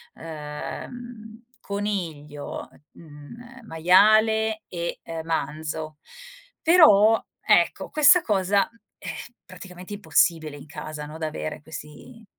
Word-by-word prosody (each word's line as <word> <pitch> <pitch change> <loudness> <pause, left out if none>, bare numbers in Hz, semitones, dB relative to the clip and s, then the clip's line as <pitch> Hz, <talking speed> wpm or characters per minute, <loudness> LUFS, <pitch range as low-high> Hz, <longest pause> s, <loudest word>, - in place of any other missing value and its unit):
ehm, 215 +9 -8 0.2
coniglio, 170 -8 -5 0.2
mhmm, 150 +8 -13 0.2
ehm, - - -17
maiale, 215 +5 +4
e, 170 -1 -4
uhm, 165 -1 -6
manzo. 155 0 -3 0.6
Però, 225 - +6 0.2
ecco, - - +2
questa 310 +4 +6
cosa, 200 -3 +1
mhmm, 230 - -27 0.2
è - - -11 0.4
praticamente 185 +1 -11
impossibile 165 -6 +1
in 145 - -11
casa, 150 0 -7
no, 155 +2 -9
da 160 -1 -3
avere 155 -1 -5
questi 160 +9 -11
180 Hz, 105 wpm, -24 LUFS, 155-220 Hz, 0.6 s, Però